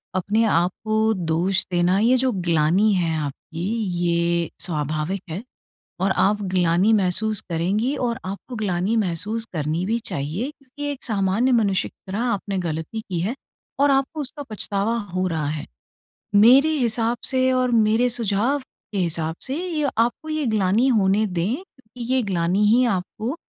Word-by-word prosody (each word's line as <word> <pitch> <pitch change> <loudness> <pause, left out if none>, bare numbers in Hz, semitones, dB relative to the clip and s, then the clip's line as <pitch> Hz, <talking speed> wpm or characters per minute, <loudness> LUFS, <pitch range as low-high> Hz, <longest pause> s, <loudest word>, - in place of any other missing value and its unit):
अपने 205 +5 +1
आपको 215 +4 +1
दोष 180 +1 0
देना, 175 +1 +2
ये 240 +4 +4
जो 260 0 +1
ग्लानि 175 +1 +2
है 170 -4 +1
आपकी 155 +3 -5 0.4
ये 170 -1 +1
स्वाभाविक 155 +3 -2
है। 175 +7 -5 0.6
और 190 +1 +1
आप 205 +2 +2
ग्लानि 180 +3 +3
महसूस 210 +1 +1
करेंगी 200 - 0
और 235 -1 -2
आपको 200 +6 -6
ग्लानि 200 0 0
महसूस 210 +3 -1
करनी 155 +2 -1
भी 225 +4 0
चाहिए 155 - -3
क्योंकि 290 +1 -7
एक 280 - -8
सामान्य 210 +3 +1
मनुष्य 205 -6 +2
की 190 - -14
तरह 200 - -2
आपने 200 -2 -2
गलती 160 +7 -4
की 185 -5 -4
है 195 +8 -1 0.5
और 285 0 +4
आपको 275 +3 0
उसका 290 +1 -4
पछतावा 210 +1 0 0.2
हो 185 0 0
रहा 160 -4 -2
है। 150 0 -4 0.7
मेरे 250 +9 +7
हिसाब 235 -1 +1
से 260 -1 +2
और 255 -1 +1
मेरे 225 +1 +3
सुझाव 235 +3 +1
के 215 -5 -10
हिसाब 165 -2 -1
से 265 - -2
ये 325 -4 -1
आपको 235 +7 0
ये 310 -2 -1
ग्लानि 215 +2 +2
होने 210 -3 +3
दें, 195 - -2 0.3
ये 250 +1 0
ग्लानि 185 0 +1
ही 235 +4 +5
आपको 220 +8 -4
205 Hz, 155 wpm, -23 LUFS, 175-235 Hz, 0.7 s, मेरे